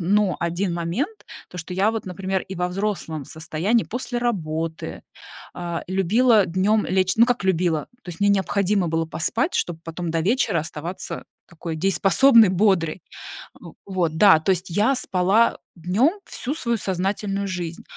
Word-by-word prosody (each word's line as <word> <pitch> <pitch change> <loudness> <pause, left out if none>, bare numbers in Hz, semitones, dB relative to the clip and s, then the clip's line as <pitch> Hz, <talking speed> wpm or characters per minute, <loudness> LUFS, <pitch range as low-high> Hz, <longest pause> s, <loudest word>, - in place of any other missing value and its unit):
но 195 +2 +2
один 175 +2 -1
момент- 190 - -3 0.2
то, 180 - -9
что 180 +2 -6
я 195 +4 +2
вот, 225 -2 -5
например, 190 +1 -2
и 190 - -8
во 180 +1 -1
взрослом 180 -6 -3
состоянии 170 +8 -1
после 245 +1 -3
работы, 165 -9 -3 0.5
э, 170 -1 -4
любила 205 +3 +3
днём 195 +5 +1
лечь. 185 0 +1
Ну, 230 +2 +6
как 245 -6 -1
любила, 170 -5 0
то - - -15
есть 165 - -10
мне 205 0 +4
необходимо 200 -1 +1
было 165 0 0
поспать, 175 - -1
чтобы 170 -2 -1
потом 170 +1 -5
до 165 0 0
вечера 205 -1 +1
оставаться 165 +3 -6 0.2
такой 165 -1 -6
дееспособной, 195 - +5
бодрой. 185 -3 +1 0.8
Вот 175 -5 -1
да, 195 -2 +7
то 160 - 0
есть 185 0 -3
я 210 +10 +2
спала 200 -1 +2 0.2
днём 220 - +1
всю 265 +4 -4
свою 235 -7 -1
сознательную 195 +1 -2
жизнь, 175 -3 -5
185 Hz, 155 wpm, -23 LUFS, 170-210 Hz, 0.8 s, да